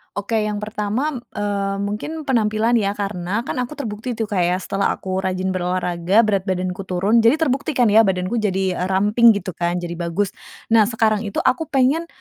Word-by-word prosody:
Oke, 205 Hz, +2 st, -1 dB
yang 210 Hz, 0 st, -3 dB
pertama, 215 Hz, +7 st, -2 dB, 0.2 s
eee, 200 Hz, -1 st, -1 dB
mungkin 210 Hz, +11 st, -4 dB
penampilan 230 Hz, -2 st, +2 dB
ya. 200 Hz, -1 st, -1 dB
Karena, 200 Hz, +1 st, -3 dB
kan, 255 Hz, -, -4 dB
aku 250 Hz, +4 st, -3 dB
terbukti 230 Hz, -2 st, -5 dB
tuh, 225 Hz, -, -2 dB
Kak, 195 Hz, -, 0 dB
ya, 180 Hz, -, +1 dB
setelah 195 Hz, +1 st, -1 dB
aku 190 Hz, 0 st, -3 dB
rajin 190 Hz, 0 st, -1 dB
berolahraga, 180 Hz, +2 st, +1 dB
berat 200 Hz, -3 st, 0 dB
badanku 185 Hz, +1 st, -2 dB
turun, 195 Hz, +6 st, +2 dB
jadi 230 Hz, +4 st, +5 dB
terbukti 285 Hz, -2 st, -1 dB
kan, 240 Hz, -4 st, +3 dB
ya, 215 Hz, -, +6 dB
badanku 190 Hz, +1 st, +1 dB
jadi, 190 Hz, -3 st, -1 dB
eee, 180 Hz, -, -1 dB
ramping, 210 Hz, +4 st, +4 dB
gitu 195 Hz, -1 st, -4 dB
kan, 175 Hz, 0 st, -2 dB
jadi 175 Hz, -1 st, -4 dB
bagus. 175 Hz, +4 st, -1 dB, 0.4 s
Nah, 220 Hz, -2 st, +5 dB
sekarang 220 Hz, -2 st, +1 dB
itu 200 Hz, -, -2 dB
aku 315 Hz, +5 st, +1 dB
pengen, 275 Hz, +5 st, +1 dB
205 Hz, 185 wpm, -21 LUFS, 185-230 Hz, 0.4 s, ya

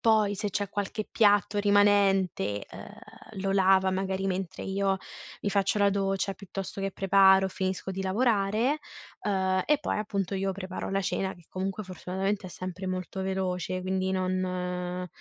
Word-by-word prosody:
Poi 215 Hz, -3 st, +3 dB
se 205 Hz, +1 st, -3 dB
c'è 200 Hz, 0 st, -1 dB
qualche 205 Hz, +1 st, -3 dB
piatto 205 Hz, -1 st, +3 dB
rimanente, 195 Hz, -, +3 dB
ehm, -, -, -10 dB, 0.5 s
lo 195 Hz, 0 st, 0 dB
lava 190 Hz, -1 st, +4 dB
magari 190 Hz, 0 st, -1 dB
mentre 190 Hz, -1 st, -3 dB
io 195 Hz, 0 st, +1 dB, 0.5 s
mi -, -, 0 dB
faccio 200 Hz, +1 st, +1 dB
la 200 Hz, 0 st, +4 dB
doccia, 195 Hz, 0 st, 0 dB
piuttosto 195 Hz, 0 st, -6 dB
che 195 Hz, 0 st, -1 dB
preparo, 190 Hz, 0 st, +5 dB
finisco 190 Hz, 0 st, -3 dB
di 190 Hz, +1 st, -3 dB
lavorare, 220 Hz, +5 st, +1 dB, 0.4 s
uhm, 190 Hz, -2 st, +1 dB
e 300 Hz, -1 st, +3 dB
poi -, -, -2 dB
appunto 200 Hz, -2 st, -2 dB
io 195 Hz, 0 st, 0 dB
preparo 185 Hz, -1 st, -5 dB
la 195 Hz, -, +1 dB
cena 190 Hz, 0 st, -1 dB
che 175 Hz, -, -19 dB
comunque 195 Hz, +2 st, -3 dB
fortunatamente 190 Hz, +2 st, -3 dB
è -, -, -13 dB
sempre 185 Hz, +1 st, -6 dB
molto 185 Hz, +1 st, -4 dB
veloce, 185 Hz, -1 st, -2 dB
quindi 190 Hz, 0 st, -1 dB
non, 185 Hz, -1 st, 0 dB
ehm, 180 Hz, 0 st, -3 dB
195 Hz, 160 wpm, -28 LUFS, 185-200 Hz, 0.5 s, preparo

